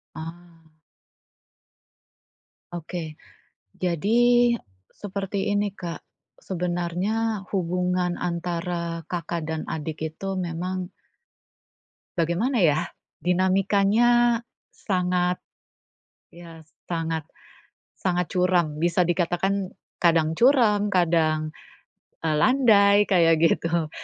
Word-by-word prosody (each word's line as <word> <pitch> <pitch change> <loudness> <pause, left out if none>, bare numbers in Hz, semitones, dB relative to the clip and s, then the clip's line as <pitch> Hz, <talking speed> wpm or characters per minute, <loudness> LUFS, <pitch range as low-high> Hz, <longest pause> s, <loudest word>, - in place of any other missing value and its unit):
Ah. 160 +1 -6 2.4
Oke. 170 -1 -5 0.6
Jadi, 235 +8 +3 0.4
seperti 200 0 -3
ini 205 -1 0
Kak, 175 -4 -7 0.3
sebenarnya, 185 +5 -2
hubungan 180 -1 0
antara 170 -1 -3
kakak 170 -1 -3
dan 160 -1 -2
adik 155 0 -4
itu 195 +3 -4
memang 180 +1 -3 1.3
bagaimana 190 - +1
ya? 155 -3 +2 0.3
Dinamikanya 200 +6 +3 0.3
sangat, 180 -2 -1 0.9
ya 170 -1 -12 0.3
sangat, 165 -1 -2 0.7
sangat 180 -3 -1
curam. 180 -4 +1
Bisa 170 +3 +2
dikatakan, 180 +2 0 0.2
kadang 160 -2 +2
curam, 220 -6 +4
kadang, 160 -3 +2 0.7
e 165 - -1
landai 205 - +5
kayak 170 -3 +5
gitu. 165 -1 +1
180 Hz, 75 wpm, -24 LUFS, 170-200 Hz, 2.4 s, landai